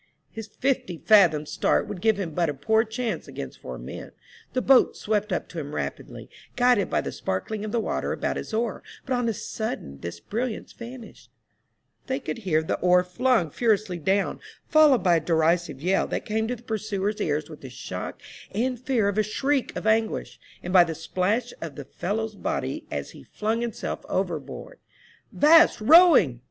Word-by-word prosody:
His 225 Hz, -1 st, -7 dB
fifty 245 Hz, -8 st, -1 dB
fathoms' 165 Hz, -8 st, +4 dB
start -, -, +1 dB
would 185 Hz, -, -6 dB
give 220 Hz, -1 st, +2 dB
him 180 Hz, -5 st, -3 dB
but 170 Hz, +1 st, 0 dB
a 145 Hz, -, -3 dB
poor 220 Hz, +11 st, +2 dB
chance 220 Hz, -4 st, -4 dB
against 65 Hz, -2 st, -8 dB
four 65 Hz, -1 st, -7 dB
men. -, -, -9 dB, 0.4 s
The 255 Hz, -, +1 dB
boat 265 Hz, -2 st, +5 dB
swept 210 Hz, -1 st, -1 dB
up 180 Hz, -, -2 dB
to 170 Hz, -, -6 dB
him 145 Hz, -1 st, -6 dB
rapidly, -, -, -5 dB, 0.3 s
guided 245 Hz, -5 st, +3 dB
by -, -, +1 dB
the -, -, -5 dB
sparkling 205 Hz, -, -3 dB
of 215 Hz, -, -4 dB
the 235 Hz, -, +1 dB
water 220 Hz, -, -2 dB
about -, -, -2 dB
his -, -, -6 dB
oar, 225 Hz, -1 st, -1 dB, 0.2 s
but 260 Hz, -, -2 dB
on 245 Hz, -2 st, +1 dB
a -, -, 0 dB
sudden 190 Hz, -, -5 dB
this 85 Hz, +3 st, -7 dB
brilliance 230 Hz, -, -4 dB
vanished; 235 Hz, -1 st, -11 dB, 0.8 s
they 265 Hz, +1 st, -1 dB
could 255 Hz, -, -5 dB
hear 165 Hz, -7 st, +1 dB
the -, -, -2 dB
oar 180 Hz, 0 st, +4 dB
flung 180 Hz, -, +1 dB
furiously 215 Hz, -5 st, 0 dB
down, 195 Hz, +5 st, 0 dB, 0.3 s
followed 300 Hz, -, +5 dB
by 175 Hz, -2 st, +4 dB
a -, -, +1 dB
derisive 160 Hz, -2 st, +1 dB
yell, 190 Hz, +2 st, +2 dB
that -, -, -3 dB
came 220 Hz, +1 st, -1 dB
to 250 Hz, -, -2 dB
the 240 Hz, -, -16 dB
pursuers' 215 Hz, -2 st, -2 dB
ears 150 Hz, -2 st, -1 dB
with 155 Hz, -2 st, -12 dB
the 135 Hz, -, -8 dB
shock 125 Hz, -, -6 dB, 0.3 s
and 245 Hz, +4 st, -1 dB
fear 245 Hz, -5 st, +1 dB
of 200 Hz, +1 st, 0 dB
a -, -, +4 dB
shriek 270 Hz, +5 st, -1 dB
of -, -, -5 dB
anguish, 220 Hz, 0 st, 0 dB, 0.2 s
and 180 Hz, -, -4 dB
by 180 Hz, -2 st, +8 dB
the 165 Hz, -2 st, -4 dB
splash 195 Hz, +9 st, -1 dB
of 160 Hz, -4 st, -6 dB
the 145 Hz, -, -8 dB
fellow's 215 Hz, +8 st, -3 dB
body 205 Hz, -, -3 dB
as -, -, -4 dB
he -, -, -13 dB
flung 220 Hz, +2 st, -2 dB
himself 235 Hz, -2 st, -4 dB
over -, -, -1 dB
board. -, -, -10 dB, 0.3 s
" -, -, -32 dB
'Vast 325 Hz, +3 st, +6 dB
rowing 265 Hz, -, +6 dB
210 Hz, 190 wpm, -25 LUFS, 170-235 Hz, 0.8 s, by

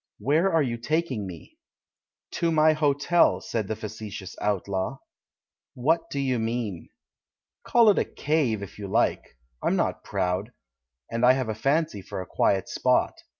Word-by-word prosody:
"Where 160 Hz, +8 st, +2 dB
are 160 Hz, -2 st, +3 dB
you 120 Hz, -3 st, -3 dB
taking 135 Hz, -, -1 dB
me?" 85 Hz, -3 st, -11 dB, 0.7 s
"To 170 Hz, -1 st, 0 dB
my 155 Hz, 0 st, +5 dB
hotel," 155 Hz, +3 st, +3 dB
said 110 Hz, -4 st, -3 dB
the 110 Hz, -, -2 dB
facetious 105 Hz, -3 st, -7 dB
outlaw. 100 Hz, +3 st, -1 dB, 0.8 s
"What 165 Hz, +6 st, +1 dB
do 140 Hz, -, -3 dB
you 130 Hz, -3 st, 0 dB
mean?" 110 Hz, -6 st, -3 dB, 0.7 s
"Call 235 Hz, -2 st, +4 dB
it -, -, +1 dB
a -, -, +1 dB
'cave' 140 Hz, -9 st, 0 dB
if 100 Hz, -, -10 dB
you 100 Hz, -, -5 dB
like 105 Hz, -, 0 dB
— -, -, -45 dB
I'm -, -, +2 dB
not -, -, -1 dB
proud, 95 Hz, +6 st, -2 dB, 0.6 s
and 115 Hz, +1 st, -2 dB
I 125 Hz, +1 st, +7 dB
have 130 Hz, -3 st, -2 dB
a -, -, 0 dB
fancy 140 Hz, 0 st, 0 dB
for 95 Hz, -, -7 dB
a 90 Hz, -, -5 dB
quiet 95 Hz, +1 st, +1 dB
spot. -, -, +1 dB
120 Hz, 160 wpm, -26 LUFS, 100-155 Hz, 0.8 s, I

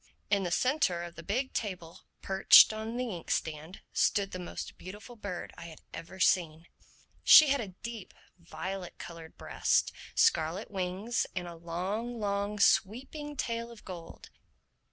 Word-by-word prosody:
In 200 Hz, -1 st, +3 dB
the 180 Hz, -, -2 dB
centre 250 Hz, -, +1 dB
of 175 Hz, 0 st, -8 dB
the 170 Hz, -, -10 dB
big 250 Hz, +9 st, -2 dB
table, 180 Hz, -6 st, -5 dB, 0.2 s
perched 195 Hz, +2 st, +7 dB
on 220 Hz, +2 st, -5 dB
the 250 Hz, -2 st, -2 dB
ink 175 Hz, -3 st, -8 dB
stand, 160 Hz, +3 st, -3 dB
stood 200 Hz, -2 st, +2 dB
the 185 Hz, -, -5 dB
most 175 Hz, -, -7 dB
beautiful 205 Hz, +6 st, -10 dB
bird 200 Hz, -5 st, -6 dB
I 170 Hz, -, -8 dB
have 160 Hz, -2 st, -13 dB
ever 190 Hz, +3 st, -9 dB
seen. 165 Hz, -3 st, +2 dB, 0.6 s
She 305 Hz, -2 st, +9 dB
had 275 Hz, -1 st, +2 dB
a 215 Hz, -, -5 dB, 0.2 s
deep 230 Hz, -3 st, -7 dB, 0.2 s
violet 185 Hz, +2 st, -6 dB
colored 165 Hz, -1 st, -10 dB
breast, -, -, +1 dB, 0.2 s
scarlet 165 Hz, +8 st, +2 dB
wings 190 Hz, +4 st, -2 dB
and 180 Hz, -1 st, -3 dB
a 170 Hz, -, -7 dB
long, 190 Hz, +8 st, -4 dB
long 200 Hz, 0 st, -1 dB
sweeping 270 Hz, +9 st, +1 dB
tail 230 Hz, -1 st, -2 dB
of 235 Hz, -2 st, -14 dB
gold. 170 Hz, -3 st, -10 dB
195 Hz, 155 wpm, -30 LUFS, 175-230 Hz, 0.6 s, She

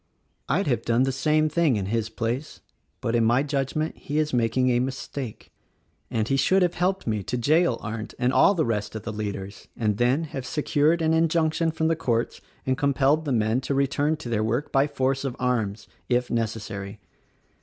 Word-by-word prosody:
"I'd 175 Hz, +9 st, +2 dB
have 120 Hz, -7 st, +1 dB
done 115 Hz, +2 st, +2 dB
the 135 Hz, -, +1 dB
same 155 Hz, +4 st, +2 dB
thing 155 Hz, -4 st, +2 dB
in 100 Hz, -2 st, -1 dB
his 110 Hz, +2 st, -1 dB
place; 120 Hz, +6 st, -4 dB, 0.4 s
but, 115 Hz, -2 st, -1 dB
in 115 Hz, -, +3 dB
my 120 Hz, +4 st, +3 dB
judgment, 145 Hz, +2 st, -2 dB
he 145 Hz, -, -4 dB
is 155 Hz, -2 st, 0 dB
making 125 Hz, +2 st, +2 dB
a 120 Hz, -, +2 dB
mistake, 130 Hz, -1 st, -5 dB, 0.6 s
and 110 Hz, -1 st, -1 dB
he 135 Hz, -, +1 dB
should 190 Hz, +7 st, +3 dB
have 175 Hz, -, +1 dB
helped 190 Hz, +2 st, 0 dB
me 110 Hz, -3 st, -1 dB
to 125 Hz, +6 st, -3 dB
jail 150 Hz, +2 st, +3 dB
Arndt 110 Hz, 0 st, -6 dB
and 125 Hz, +2 st, +1 dB
all 200 Hz, -, +5 dB
the 160 Hz, -3 st, +1 dB
rest 105 Hz, -2 st, -2 dB
of 110 Hz, -, -5 dB
the 110 Hz, -, -5 dB
leaders, 100 Hz, -2 st, -5 dB
and 105 Hz, -3 st, 0 dB
then 125 Hz, +7 st, +2 dB
have 140 Hz, -4 st, -5 dB
secured 150 Hz, +4 st, +1 dB
an 160 Hz, 0 st, +3 dB
injunction 165 Hz, 0 st, +2 dB
from 160 Hz, 0 st, -1 dB
the 165 Hz, -, +2 dB
courts 120 Hz, -7 st, -1 dB, 0.2 s
and 130 Hz, 0 st, 0 dB
com 140 Hz, -1 st, +1 dB
pelled 145 Hz, +4 st, +3 dB
the 145 Hz, -, -1 dB
men 110 Hz, +1 st, +1 dB
to 140 Hz, -, -2 dB
return 145 Hz, +3 st, +1 dB
to 150 Hz, -, -8 dB
their 110 Hz, -2 st, 0 dB
work 120 Hz, +6 st, -1 dB
by 135 Hz, +1 st, +3 dB
force 135 Hz, -1 st, -1 dB
of 135 Hz, -3 st, -3 dB
arms 110 Hz, -5 st, -1 dB
— -, -, -36 dB
if 125 Hz, 0 st, +1 dB
necessary. 110 Hz, -3 st, -3 dB
130 Hz, 205 wpm, -25 LUFS, 115-150 Hz, 0.6 s, all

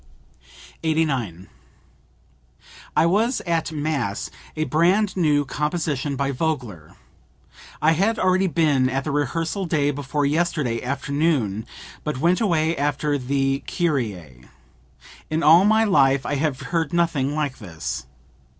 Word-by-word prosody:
89. 135 Hz, -, -1 dB, 1.5 s
"I 155 Hz, -, +5 dB
was 220 Hz, +9 st, +2 dB
at 165 Hz, -1 st, -1 dB
mass, 145 Hz, -9 st, -2 dB, 0.2 s
a 155 Hz, -, 0 dB
brand 180 Hz, +6 st, +2 dB
new 150 Hz, -5 st, +2 dB
composition 150 Hz, -1 st, -2 dB
by 140 Hz, +1 st, -1 dB
Vogler. 125 Hz, -, -3 dB, 0.9 s
I 155 Hz, -, +5 dB
had 200 Hz, +8 st, +1 dB
already 185 Hz, +1 st, +2 dB
been 150 Hz, -7 st, +2 dB
at 135 Hz, +1 st, -1 dB
the 155 Hz, -, -3 dB
rehearsal 165 Hz, +7 st, -1 dB
day 145 Hz, -3 st, +1 dB
before 145 Hz, +1 st, -2 dB
yesterday 150 Hz, -6 st, 0 dB
afternoon, 140 Hz, -5 st, -1 dB, 0.4 s
but 150 Hz, -3 st, -3 dB
went 170 Hz, -, +2 dB
away 165 Hz, -5 st, +1 dB
after 145 Hz, 0 st, 0 dB
the 135 Hz, +1 st, 0 dB
Kyrie. 105 Hz, -, -2 dB, 0.8 s
In 160 Hz, +2 st, -1 dB
all 170 Hz, +5 st, +7 dB
my 220 Hz, +1 st, +4 dB
life 140 Hz, -9 st, +3 dB
I -, -, -2 dB
have 145 Hz, -2 st, -1 dB
heard 165 Hz, -3 st, -2 dB
nothing 150 Hz, -5 st, +1 dB
like 145 Hz, -4 st, -2 dB
this. 80 Hz, -, -6 dB
150 Hz, 125 wpm, -23 LUFS, 135-165 Hz, 1.5 s, all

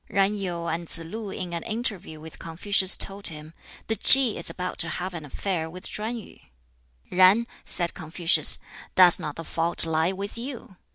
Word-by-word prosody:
Yen 195 Hz, +1 st, +1 dB
Yu 175 Hz, -4 st, -5 dB
and 170 Hz, 0 st, -5 dB
Tsz -, -, +8 dB
lu 205 Hz, +6 st, -8 dB
in 180 Hz, -2 st, -7 dB
an 170 Hz, -, -4 dB
interview 215 Hz, -8 st, -6 dB
with 160 Hz, +1 st, -13 dB
Confucius 185 Hz, +3 st, +2 dB
told 200 Hz, +1 st, +2 dB
him, 155 Hz, 0 st, -9 dB, 0.3 s
"The 220 Hz, -, -3 dB
Ki 260 Hz, -1 st, +7 dB
is -, -, +2 dB
about 180 Hz, 0 st, -7 dB
to 170 Hz, -, -1 dB
have 185 Hz, +1 st, -6 dB
an 160 Hz, -3 st, -9 dB
affair 160 Hz, +2 st, -5 dB
with 180 Hz, +2 st, -9 dB
Chuen 220 Hz, +3 st, -6 dB
yu." 220 Hz, -, -14 dB, 0.7 s
"Yen," 185 Hz, +5 st, +3 dB, 0.2 s
said 170 Hz, -2 st, -4 dB
Confucius, 165 Hz, +2 st, +3 dB, 0.4 s
"does 180 Hz, -2 st, +5 dB
not 150 Hz, -, -7 dB
the 165 Hz, -, -8 dB
fault 170 Hz, +1 st, -1 dB
lie 160 Hz, +2 st, -1 dB
with 200 Hz, +4 st, -8 dB
you? 235 Hz, -7 st, -9 dB
180 Hz, 180 wpm, -24 LUFS, 165-205 Hz, 0.7 s, Tsz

